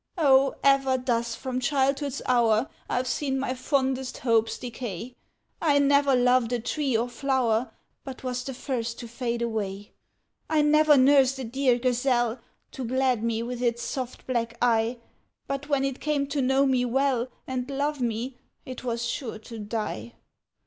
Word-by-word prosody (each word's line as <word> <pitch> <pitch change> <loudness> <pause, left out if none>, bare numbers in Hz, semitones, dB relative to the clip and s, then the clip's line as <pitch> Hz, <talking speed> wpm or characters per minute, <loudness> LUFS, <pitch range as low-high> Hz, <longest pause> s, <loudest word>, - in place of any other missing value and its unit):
O, 275 -4 +4
ever 270 -1 +4
thus, 235 -2 -1
from 255 -1 -3
childhood's 275 +1 0
hour, 235 -1 +3 0.2
I've 250 +1 0
seen 270 +1 -1
my 265 -1 -1
fondest 265 -1 -1
hopes 225 -2 +1
decay; 240 -2 -6 0.5
I 295 -4 +3
never 280 -1 +4
loved 250 -1 +3
a 245 - +1
tree 260 +1 0
or 235 +2 0
flower 250 -3 0 0.3
But 265 -2 -7
't - - -11
was 250 0 -2
the 265 0 -6
first 235 -3 -3
to 235 - -7
fade 235 0 -3
away. 205 -3 -3 0.6
I 310 -1 +3
never 305 0 +5
nursed 270 0 +5
a 265 - -5
dear 250 +1 +1
gazelle, 245 -1 +1 0.3
To 265 - -6
glad 255 -1 +1
me 230 0 0
with 245 0 -5
its 235 -1 0
soft 255 -2 -5
black 235 -2 -2
eye, 230 0 +2 0.5
But 275 +1 -4
when 280 -2 +2
it 270 -1 -3
came 295 -2 0
to 285 -1 0
know 265 +2 +3
me 260 -2 +2
well, 255 0 +1 0.2
And 255 0 -3
love 285 +1 -1
me, 240 +2 -2 0.3
it 255 -1 -7
was 235 -1 -2
sure 230 -1 -4
to 225 +1 -10
die! 210 - -4
255 Hz, 165 wpm, -26 LUFS, 235-270 Hz, 0.6 s, never